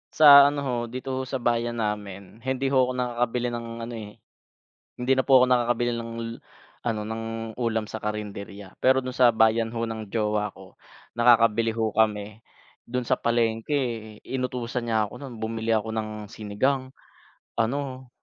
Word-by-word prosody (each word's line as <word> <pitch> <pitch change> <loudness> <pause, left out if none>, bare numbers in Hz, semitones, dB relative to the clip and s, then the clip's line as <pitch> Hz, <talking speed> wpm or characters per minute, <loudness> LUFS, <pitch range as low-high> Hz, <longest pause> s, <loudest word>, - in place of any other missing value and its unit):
Sa 140 -2 +10
ano 145 0 -1
ho, 130 -2 -1
dito 130 +3 -6
ho - - -2
sa 135 - -4
bayan 120 -2 0
namin 105 -1 -5
hindi 130 +2 -1
ho 130 -2 +4
ako - - -2
nakakabili 125 -1 -1
ng 120 0 -5 0.2
ano 120 +1 -6
eh 105 -2 -8 0.8
hindi 125 +2 0
na 130 - +2
po 135 -2 +6
ako 125 - +6
nakakabili 120 -1 +2
l - - -3
ng 115 - -7 0.7
ano 110 -3 -1
ng 110 0 -4 0.3
ulam 115 -3 -1
sa 110 - -5
karinderya. 100 -2 -6
Pero 130 +1 +5
dun 130 -1 -5
sa 125 -2 +6
bayan 110 0 +3
ho 115 0 -2
ng 110 -3 -6
jowa 105 -2 0
ko, 95 -1 -15 0.4
nakakabili 115 -1 +4
ho 110 -1 -2
kami. 110 0 0 0.4
Dun 125 0 -3
sa - - +3
palengke 115 -1 -1
inutusan 125 -2 -3
niya 110 -1 +2
ako - - -15
nun 130 -5 -9
bumili 110 0 -2
ako 110 0 0
ng 110 -1 -2 0.2
sinigang 130 +7 -1 0.7
ano 130 +2 -2
115 Hz, 165 wpm, -25 LUFS, 110-125 Hz, 0.8 s, Sa